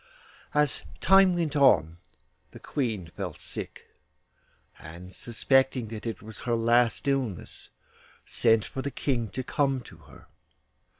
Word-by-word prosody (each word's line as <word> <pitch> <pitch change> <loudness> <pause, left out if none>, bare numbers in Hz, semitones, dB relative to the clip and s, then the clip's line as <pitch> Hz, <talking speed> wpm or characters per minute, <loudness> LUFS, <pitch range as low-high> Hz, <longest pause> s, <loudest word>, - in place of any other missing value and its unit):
As 150 -2 +1 0.2
time 195 -1 +5
went 165 -3 -1
on 85 - +4 0.5
the - - -13
Queen 110 - -3
fell - - -5
sick, - - -7 0.9
and 85 +4 -11
suspecting 130 +1 +1
that 110 +1 -6
it 115 - -5
was 110 0 -10
her 120 -1 -1
last 120 +3 +2
illness, 130 -10 -2 0.6
sent 115 -2 +2
for 135 - -5
the 140 - -3
King 120 -5 -2
to 130 +8 -4
come 135 +1 0
to 95 -8 -14
her. 70 -3 -17
120 Hz, 130 wpm, -27 LUFS, 105-135 Hz, 0.9 s, time